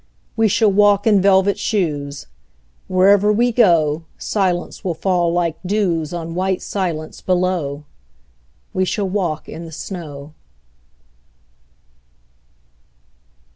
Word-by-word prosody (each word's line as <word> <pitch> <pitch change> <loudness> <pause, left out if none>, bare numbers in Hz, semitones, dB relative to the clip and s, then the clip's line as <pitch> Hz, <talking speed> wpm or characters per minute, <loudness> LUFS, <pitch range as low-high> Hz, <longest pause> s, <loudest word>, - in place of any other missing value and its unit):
We 225 -1 +3
shall 215 +1 +3
walk 205 0 +4
in 210 -4 +4
velvet 195 +1 +3
shoes: 145 -8 -2 0.6
Wherever 195 +3 +4
we 240 +3 +2
go 165 -9 +3
Silence 185 -4 -2
will 175 -3 -2
fall 175 -1 +1
like 170 -2 -1
dews 180 -5 -1
On 165 -1 -5
white 185 +1 -1
silence 170 -6 -4
below. 180 -6 -1 0.9
We 185 - +1
shall 195 +2 -1
walk 180 -5 -2
in 165 - -8
the 165 - -10
snow. 150 -4 -8
185 Hz, 105 wpm, -19 LUFS, 165-200 Hz, 0.9 s, walk